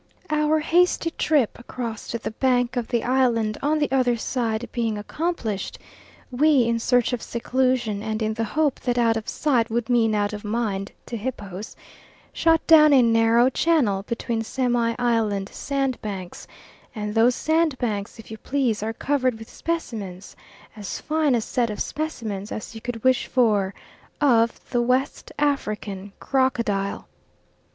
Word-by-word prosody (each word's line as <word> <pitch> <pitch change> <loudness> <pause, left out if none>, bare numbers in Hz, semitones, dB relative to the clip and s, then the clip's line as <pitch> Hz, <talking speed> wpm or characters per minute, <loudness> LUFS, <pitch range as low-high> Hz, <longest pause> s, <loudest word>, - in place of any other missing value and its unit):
Our 305 +1 +2
hasty 340 +1 +2
trip 295 -9 +1
across 235 -2 -6
to 235 - -2
the 225 - -5
bank 245 +1 +1
of 240 -2 -2
the 235 - 0
island 235 -4 +1
on 300 +2 +1
the 295 -3 0
other 250 -3 +2
side 230 -1 -2
being 230 -3 -1
accomplished, 220 - -3 0.5
we, 280 +1 +4
in 230 0 0
search 245 +1 +2
of 240 - -2
seclusion 245 -3 0
and 220 0 -3
in 220 -1 -1
the 225 +1 -2
hope 290 +5 0
that 245 -1 -1
out 230 -1 +3
of 225 -1 -4
sight 255 -7 +1
would 235 +2 -1
mean 225 -3 +3
out 205 0 0
of 210 - -6
mind 210 -3 -2
to 240 - -6
hippos, 210 -4 -6 0.6
shot 325 -1 +2
down 305 -2 +7
a 260 -3 +6
narrow 230 +1 +4
channel 260 -12 +2
between 230 +2 -3
semi 240 -1 0
island 220 -5 0
sandbanks, 240 -10 -4 0.5
and 210 -1 -3
those 235 +3 +4
sandbanks, 260 -12 0
if 225 -1 -12
you 220 - -7
please, 255 -6 0
are 220 +1 -2
covered 255 -1 0
with 225 0 -11
specimens 210 - -5 0.4
as 205 -4 -5
fine 305 -4 +1
a 235 - +1
set 235 +1 -1
of 210 - -5
specimens 220 -10 -4
as 215 - -6
you 225 - -9
could 240 -2 -5
wish 260 -1 +3
for 210 -6 +2 0.5
of 235 -5 +3
the 240 - +2
West 255 +3 0
African 215 -9 -2
crocodile. 235 -7 0
235 Hz, 155 wpm, -24 LUFS, 215-265 Hz, 0.6 s, down